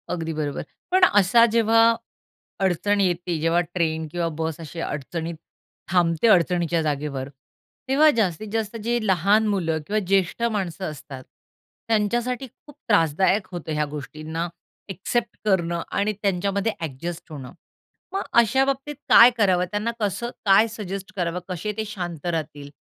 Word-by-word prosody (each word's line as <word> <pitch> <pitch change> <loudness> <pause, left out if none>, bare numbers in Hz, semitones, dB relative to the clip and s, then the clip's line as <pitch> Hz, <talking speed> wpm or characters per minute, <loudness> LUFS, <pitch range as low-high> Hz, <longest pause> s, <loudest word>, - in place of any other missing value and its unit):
अगदी 165 -2 -3
बरोबर. 150 -2 -3 0.3
पण 370 0 +3
असा 205 +4 +6
जेव्हा 225 0 +4 0.8
अडचण 195 +2 +1
येते, 175 -2 0
जेव्हा 165 +2 +2
ट्रेन 160 -2 -1
किंवा 170 0 -1
बस 160 -1 -3
अशी 165 +1 -8
अडचणीत 165 +3 -4 0.6
थांबते, 175 +2 +2
अडचणीच्या 175 -4 +3
जागेवर, 145 -3 -3 0.6
तेव्हा 290 +4 +5
जास्तीत-जास्त 215 +3 -1
जे 240 +1 +1
लहान 200 +4 +3
मुलं 170 -6 0
किंवा 215 +1 +1
ज्येष्ठ 195 +3 +1
माणसं 190 -3 -3
असतात, 135 -3 -10 0.6
त्यांच्यासाठी 240 +4 0
खूप 290 +4 -19
त्रासदायक 190 0 +2
होतं 175 -3 -6
ह्या 150 0 0
गोष्टींना 155 +3 -5 0.4
एक्सेप्ट 230 +5 -2
करणं 170 -4 +1
आणि 205 +1 0
त्यांच्यामध्ये 200 +2 0
एडजस्ट 165 +3 -6
होणं. 135 -4 -8 0.6
मग 390 - -1 0.2
अशा 265 +4 +2
बाबतीत 275 +2 -2
काय 235 - +9
करावं? 185 -4 +3
त्यांना 210 +3 -1
कसं 215 +3 -2 0.2
काय 200 +3 +6
सजेस्ट 195 -3 -6
करावं? 175 -2 -1
कसे 185 +3 -3
ते 220 - -2
शांत 175 -7 -6
राहतील 155 -4 -4
185 Hz, 135 wpm, -23 LUFS, 165-215 Hz, 0.8 s, काय